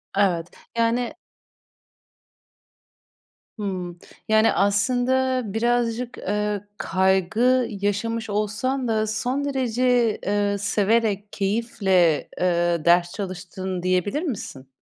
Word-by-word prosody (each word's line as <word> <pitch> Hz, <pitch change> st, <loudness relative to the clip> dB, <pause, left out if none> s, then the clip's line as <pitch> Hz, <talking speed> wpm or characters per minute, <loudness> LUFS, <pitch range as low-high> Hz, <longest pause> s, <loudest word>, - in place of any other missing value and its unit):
Evet. 180 Hz, -4 st, +1 dB, 0.3 s
Yani 235 Hz, +4 st, +1 dB, 2.4 s
Hımm, 180 Hz, -4 st, -4 dB, 0.3 s
yani 220 Hz, +1 st, +4 dB
aslında 255 Hz, +6 st, +2 dB
birazcık, 240 Hz, +1 st, 0 dB
ııı, 210 Hz, 0 st, -2 dB
kaygı 205 Hz, +7 st, +2 dB
yaşamış 210 Hz, +2 st, -2 dB
olsan 225 Hz, +6 st, -1 dB
da 220 Hz, -1 st, +1 dB
son 250 Hz, +6 st, -1 dB
derece, 250 Hz, -3 st, +1 dB
ııı, 205 Hz, 0 st, +1 dB
severek 205 Hz, 0 st, +1 dB
keyifle, 195 Hz, -6 st, +1 dB
ııı, 175 Hz, -2 st, +1 dB
ders 175 Hz, 0 st, +4 dB
çalıştın 185 Hz, -1 st, -5 dB
diyebilir 185 Hz, -, 0 dB
misin? 190 Hz, -, -5 dB
210 Hz, 85 wpm, -23 LUFS, 190-240 Hz, 2.4 s, yani